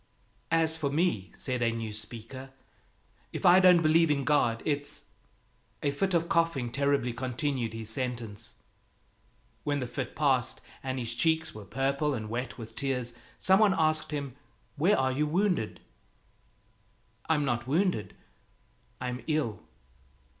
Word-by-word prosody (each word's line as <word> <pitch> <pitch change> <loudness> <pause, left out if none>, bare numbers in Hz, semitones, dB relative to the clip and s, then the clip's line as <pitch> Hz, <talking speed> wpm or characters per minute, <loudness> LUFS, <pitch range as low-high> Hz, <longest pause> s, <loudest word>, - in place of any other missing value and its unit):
"As 160 -1 +2
for 155 -3 -1
me," 140 - 0
said 125 -2 -3
a 115 -1 +3
new 115 -2 -4
speaker, 115 +5 -7 0.8
"if - - -4
I 180 +1 +8
don't 180 -2 +6
believe 160 +1 +5
in 140 -2 +1
God, 125 -5 +2
it's 145 -1 -2 0.4
" - - -26
A 140 - +2
fit 190 +6 0
of 170 0 +2
coughing 165 -9 +1
terribly 140 -2 +1
continued 130 -1 -2
his 110 -1 -6
sentence. 115 -4 -5 1.1
When 145 -1 0
the 130 - -2
fit 125 +1 -5
passed 130 -4 +1 0.2
and 130 0 -3
his 120 -2 -1
cheeks 160 +5 +1
were 105 -1 -9
purple 140 +4 0
and 110 -2 -5
wet 125 +1 -3
with 115 -2 -9
tears, 125 -2 -2 0.2
some 190 +1 +4
one 210 -3 +5
asked 155 -1 +2
him, 140 -4 -4 0.4
"Where 175 +8 +3
are 130 0 +2
you 150 +3 0
wounded?" 175 - 0 1.5
"I'm 150 -3 +3
not 120 -2 -1
wounded; 150 - 0 0.8
I'm 125 0 -4
ill." 150 - 0
135 Hz, 145 wpm, -29 LUFS, 120-155 Hz, 1.5 s, I